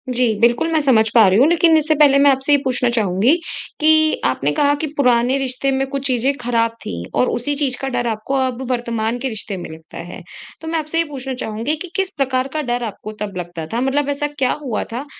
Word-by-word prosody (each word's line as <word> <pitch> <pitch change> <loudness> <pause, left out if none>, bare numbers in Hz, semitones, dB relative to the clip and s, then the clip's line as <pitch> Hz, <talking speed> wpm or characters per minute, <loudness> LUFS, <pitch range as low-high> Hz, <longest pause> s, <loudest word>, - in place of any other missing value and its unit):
जी 250 0 +3
बिल्कुल, 240 +8 +2
मैं 315 - +3
समझ 225 -6 +3
पा 220 -4 +7
रही 190 +4 +3
हूँ, 275 - +6
लेकिन 330 -1 +4
इससे 310 0 +1
पहले 285 -2 +5
मैं 285 0 +6
आपसे 270 +2 0
ये - - +6
पूछना 250 -2 +1
चाहूँगी 220 - +2 0.4
कि 315 0 +3
आपने 140 +3 0
कहा 290 0 +4
कि 310 - -1
पुराने 250 0 +2
रिश्ते 270 0 0
में 270 0 0
कुछ 275 0 -5
चीज़ें 255 +2 +1
ख़राब 230 -1 0
थीं 85 -1 -5 0.2
और 250 - +3
उसी 285 +5 -1
चीज़ 275 -3 +1
का 270 - -2
डर 240 -1 -1
आपको 225 +5 -3
अब 255 0 -4
वर्तमान 235 -1 -2
के 265 +1 -2
रिश्ते 210 -3 -1
में 175 - -8
लगता 160 0 -12
है। 175 +1 -8 0.4
तो 320 - -8
मैं 325 0 -1
आपसे 310 +2 -3
ये - - +3
पूछना 265 -2 -5
चाहूँगी 230 +4 -3
कि 360 - -6
किस 385 -1 0
प्रकार 260 -1 0
का 310 - -1
डर 245 -2 -2
आपको 215 0 -6
तब 200 -3 -4
लगता 175 -2 -6
था, 240 - -1
मतलब 280 +2 0
ऐसा 285 +1 -1
क्या 255 -1 +1
हुआ 240 -5 -2
था, 260 +5 -4
255 Hz, 235 wpm, -19 LUFS, 230-285 Hz, 0.4 s, पा